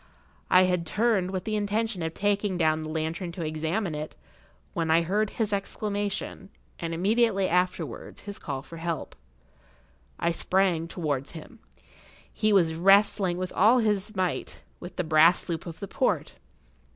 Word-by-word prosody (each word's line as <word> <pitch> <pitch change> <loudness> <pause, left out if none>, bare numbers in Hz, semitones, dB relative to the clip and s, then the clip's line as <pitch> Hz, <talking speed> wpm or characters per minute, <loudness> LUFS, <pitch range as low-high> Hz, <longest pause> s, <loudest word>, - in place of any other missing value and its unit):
I 185 - +7
had 180 -2 0
turned 210 -2 +1
with 185 -1 -3
the 215 -1 -2
intention 210 -1 -1
of 160 0 -3
taking 205 -2 0
down 160 -2 +2
the 155 - -5
lantern 160 +3 -3
to 170 -2 -4
examine 160 +4 -2
it, 150 +1 -5 0.6
when 165 -1 -1
I 165 +1 +4
heard 205 +5 0
his 215 -3 -2
exclamation, 200 -1 -3 0.3
and 165 -1 -3
immediately 195 +3 +2
afterwards 180 -6 -2
his 205 0 -7
call 135 -2 -5
for 165 - -11
help. 165 0 -4 1.0
I 170 - +1
sprang 175 -1 +1
towards 150 -5 -3
him. 175 +9 -11 0.7
He 215 0 +1
was 175 -5 +4
wrestling 195 +1 +4
with 185 0 -4
all 220 +6 +5
his 215 -2 0
might, 185 -2 -2 0.2
with 175 - -9
the 180 - -1
brass 160 +2 +4
loop 170 0 -4
of 165 -1 -8
the 200 - -5
port. 255 - 0
180 Hz, 155 wpm, -27 LUFS, 165-205 Hz, 1.0 s, I